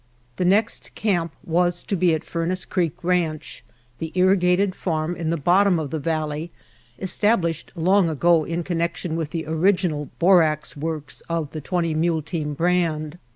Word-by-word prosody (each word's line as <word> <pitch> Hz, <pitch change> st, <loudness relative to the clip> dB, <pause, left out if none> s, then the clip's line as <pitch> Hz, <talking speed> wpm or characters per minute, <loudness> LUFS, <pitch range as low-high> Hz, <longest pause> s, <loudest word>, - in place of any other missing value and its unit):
The 180 Hz, -, 0 dB
next 205 Hz, +4 st, +1 dB
camp 175 Hz, -6 st, 0 dB
was 175 Hz, +1 st, +1 dB
to 200 Hz, -, -2 dB
be 175 Hz, -2 st, +3 dB
at 155 Hz, -, -5 dB
Furnace 175 Hz, +2 st, -3 dB
Creek 175 Hz, -2 st, -2 dB
Ranch, 170 Hz, -3 st, -1 dB, 0.4 s
the 160 Hz, -1 st, -4 dB
irrigated 185 Hz, +1 st, +3 dB
farm 165 Hz, -2 st, -2 dB
in 165 Hz, -2 st, -3 dB
the 165 Hz, -, 0 dB
bottom 180 Hz, +4 st, +3 dB
of 155 Hz, -4 st, -3 dB
the 160 Hz, -, -2 dB
valley 155 Hz, +1 st, -2 dB, 0.5 s
established 185 Hz, -, 0 dB
long 185 Hz, +1 st, +3 dB
ago 165 Hz, +1 st, +3 dB
in 170 Hz, +2 st, -3 dB
connection 170 Hz, -1 st, -2 dB
with 165 Hz, -3 st, -2 dB
the 160 Hz, 0 st, -4 dB
original 160 Hz, -2 st, +1 dB
borax 165 Hz, -4 st, +3 dB
works 150 Hz, -2 st, -5 dB
of 165 Hz, -3 st, -2 dB
the 155 Hz, -, -6 dB
Twenty 170 Hz, 0 st, -1 dB
Mule 160 Hz, 0 st, +1 dB
Team 150 Hz, -3 st, -3 dB
brand. 165 Hz, -1 st, 0 dB
170 Hz, 155 wpm, -23 LUFS, 155-180 Hz, 0.5 s, be